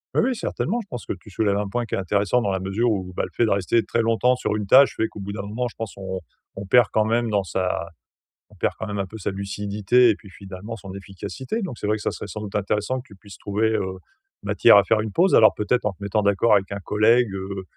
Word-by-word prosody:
Oui, - - +4
oui, 255 -1 0
certainement. 225 +1 -2
Je 200 - -14
pense 120 - -7
que - - -1
tu 100 - -15
soulèves 100 0 +1
un 105 -1 -2
point 120 +3 -2
qui - - -3
est - - -2
intéressant 100 +5 +1
dans 100 -3 0
la 95 - -1
mesure 100 +6 0
où, 95 -3 -3
bah, - - -1
le - - -5
fait 120 - +2
de - - 0
rester 100 +4 +2
très 115 - 0
longtemps 115 +3 +2
sur 105 - -2
une 105 -2 -3
tâche 135 +4 +6
fait 110 - 0
qu'au - - -11
bout 100 +1 -5
d'un 100 - -5
moment, 110 +5 -3
je - - -17
pense, 115 -2 -6
on 95 -1 -5 0.4
on 95 0 -7
perd 120 +1 +6
quand 110 0 +3
même 115 +1 +1
dans 100 -2 +1
sa 90 -2 -2 0.6
on - - -20
perd - - 0
quand 110 - -5
même 100 0 -4
un 95 - -1
peu 110 - -10
de 110 - -10
sa 95 - -2
lucidité 105 +4 +1
et 105 - 0
puis 100 - -16
finalement 100 +4 -9
son 95 -4 -9
efficacité. 130 - -6
Donc 165 -11 -5
c'est - - -4
vrai 105 +1 +1
que - - -9
ça - - 0
serait - - -7
sans 105 +2 -7
doute 105 -1 -5
intéressant 105 +5 -1
que 130 - -16
tu 100 - -15
puisses 100 +1 -14
trouver, 105 +2 0
heu, 95 0 -3 0.4
matière - - +5
à 100 - +7
faire 110 -1 +2
une 110 -2 -4
pause. 185 +3 +4
Alors, 110 - +7
peut-être 105 +3 0
en 105 - +1
te 100 +2 -18
mettant 100 +2 0
d'accord 100 +2 +3
avec 100 -1 +1
un 100 - -4
collègue, 110 +2 +3
heu, 95 0 -5
105 Hz, 285 wpm, -23 LUFS, 100-115 Hz, 0.6 s, à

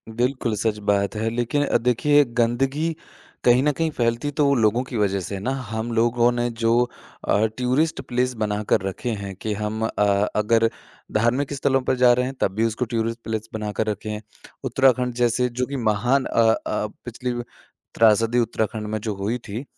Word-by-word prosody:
बिल्कुल, 125 -2 0
सच 110 0 0
बात 100 +1 +1
है। 110 +1 -1
लेक़िन 120 +5 0
अ, - - +2
देखिए 125 +5 +3 0.2
गंदगी 135 +7 +1 0.5
कहीं 125 +1 +5
न 150 - +3
कहीं 160 +3 -1
फ़ैलती 120 +1 0
तो 140 -2 +4
लोगों 115 +1 +3
की 130 -2 -6
वजह 100 -2 +1
से 100 - -5
है 95 - -6
ना। 125 - -1 0.2
हम 110 +1 -3
लोगों 120 +1 +3
ने 120 0 -1
जो 115 0 +3 0.6
अ, 105 +2 +3
टूरिस्ट 130 +6 +1
प्लेस 125 +1 -1
बनाकर 105 -2 0
रखे 95 +5 -4
हैं 100 -1 -6
कि 105 +3 -3
हम 105 +1 -3
अ, 105 -1 +1
अगर 115 +2 +3 0.4
धार्मिक 125 +6 +1
स्थलों 135 -1 +1
पर 130 +1 0
जा 125 -1 +5
रहे 125 +1 +1
हैं 130 - -4
तब - - +2
भी 115 +1 +2
उसको 115 +3 -1
टूरिस्ट 115 +1 -1
प्लेस 110 0 -4
बनाकर 110 0 -2
रखे 105 +1 -3
हैं। 105 0 -4 0.4
उत्तराखंड 125 -1 +2
जैसे 125 +1 +2
जो 125 +1 -2
कि 140 - -6
महान 120 +4 +1
अ - - +1
अ, 105 - -2 0.2
पिछली 125 +1 -4 0.6
त्रासदी 115 +2 +4
उत्तराखंड 110 -1 -1
में 110 0 -2
जो 110 -1 -2
हुई 105 +5 -2
थी, 110 +5 -5
115 Hz, 185 wpm, -23 LUFS, 110-125 Hz, 0.6 s, कहीं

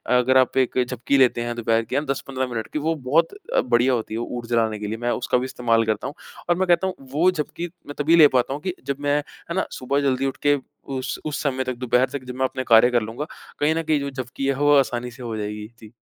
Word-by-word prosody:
अगर 130 +1 +4
आप 130 0 +3
एक 130 -1 +2
झपकी 125 +3 0
लेते 125 -2 +4
हैं, 120 0 -3
दोपहर 115 -1 +1
की 125 - -5
हाँ 145 +2 +1
10-15 135 -1 -2
मिनट 115 -2 -4
की, 150 - 0
वो 160 +2 0
बहुत 155 - +1 0.3
बढ़िया 125 +1 +3
होती 110 -2 -2
है, 110 - -2
वो 120 - -2
ऊर्जा 120 0 -3
लाने 110 -2 +1
के 105 - -4
लिए। 110 +2 -3
मैं 120 +1 -1
उसका - - +1
भी 125 - -1
इस्तेमाल 120 -3 +1
करता 110 -1 -1
हूँ। - - -6 0.4
और 175 - +4
मैं 190 +1 0
कहता 175 +2 +3
हूँ, 185 - -3
वो 145 +7 +2
झपकी 170 +1 -4 0.2
मैं 145 - -6
तभी 160 +3 +4
ले 160 -3 +9
पाता 125 +2 +1
हूँ 145 - -5
कि 185 0 -2
जब 140 0 -3
मैं 145 0 +2
है 170 +3 -7
ना? 190 - +1
सुबह 140 +2 -1
जल्दी 135 -1 +1
उठ 135 - -2
के 145 0 +5 0.3
उस 130 0 -3
उस 150 -2 -3
समय 130 -2 0
तक 130 -1 -3
दोपहर 125 +1 +2
तक 140 -2 -5
जब 125 0 -7
मैं 130 - +1
अपने 130 0 -3
कार्य 115 +1 +7
कर 120 - +3
लूँगा, 115 +7 -5 0.3
कहीं 150 +2 +2
न 165 - -1
कहीं 155 -2 +1
जो 140 - -3
झपकी 130 +1 -4
है, 140 - +3
वो 145 +1 +4
आसानी 125 -2 -1
से 125 +1 -11
हो 115 -2 -4
जाएगी। 105 0 -5
जी। 110 -1 -13
130 Hz, 270 wpm, -23 LUFS, 120-145 Hz, 0.4 s, ले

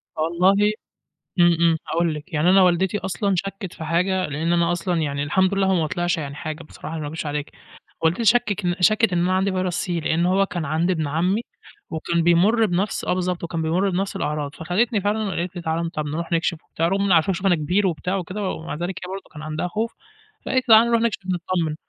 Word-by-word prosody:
والله 185 +6 +3 0.7
إمم، 175 -1 +5
إمم، 165 -1 +4
هاقول 170 -1 0
لِك 150 +4 -9
يعني 155 +4 +3
أنا 190 0 +6
والدتي 185 +2 +2
أصلًا 190 +2 -1
شكِّت 195 -1 -4
في 160 - -8
حاجة، 180 +3 +1
لأن 160 +4 -1
أنا 170 0 +2
أصلًا 175 -1 -1
يعني 140 -1 -2
الحمد 190 +6 +2
لله 195 -1 +2
هو 190 - +3
ما 160 -3 +1
طلعش 175 +2 -1
يعني 140 -2 -5
حاجة 155 +1 -6
بصراحة، 160 +1 -8
ما 150 - -4
أكدبش 160 +2 -5
عليكِ، 145 0 -3 0.5
والدتي 170 +8 +2
شكِّك 205 -6 +2
شكِّت 215 +2 +4
إن 175 - +2
أنا 180 +2 +1
عندي 190 +1 +1
فيرس 185 -1 -1
C، - - -9
لأن 165 +1 0
هو 190 +2 +3
كان 175 -4 -4
عند 160 +5 +1
ابن 160 -4 -1
عمي 180 +9 +1 0.5
وكان 165 +1 -1
بيمُرّ 200 +7 +4
بنَفْس 195 +2 -1
آه - - +1
بالضبط، 180 -1 -2
وكان 165 -1 -3
بيمُرّ 175 +5 +1
بنَفْس 190 +2 -2
الأعراض، 150 -1 -3
فخدتني 205 +7 0
فعلًا 210 +1 0
وقالت 180 -1 -3
لي 175 - -5
تعالَ 165 +1 -1
طَب 155 -1 -3
نرُوح 165 +4 -4
نكشِف 165 -1 0
وبتاع، 165 +1 -1
رغم 195 +1 +2
عارفة 170 +3 +3
شوفي 195 +2 -1
أنا 175 - +4
كبير 180 +6 +1
وبتاع 180 +3 -2
وكده، 190 +2 -3
ومع 160 - -5
ذلك 175 +4 -4
هي 185 - -7
برضه 195 0 -6
كان 150 - -9
عندها 155 +3 -3
خوف، 220 +5 -3 0.5
فقالت 260 -2 0
لي 220 - +10
تعالَ 230 +2 +6
نرُوح 235 -1 +2
نكشِف 230 -3 0
نتطَّمن، 175 -3 -1
175 Hz, 215 wpm, -22 LUFS, 160-195 Hz, 0.7 s, لي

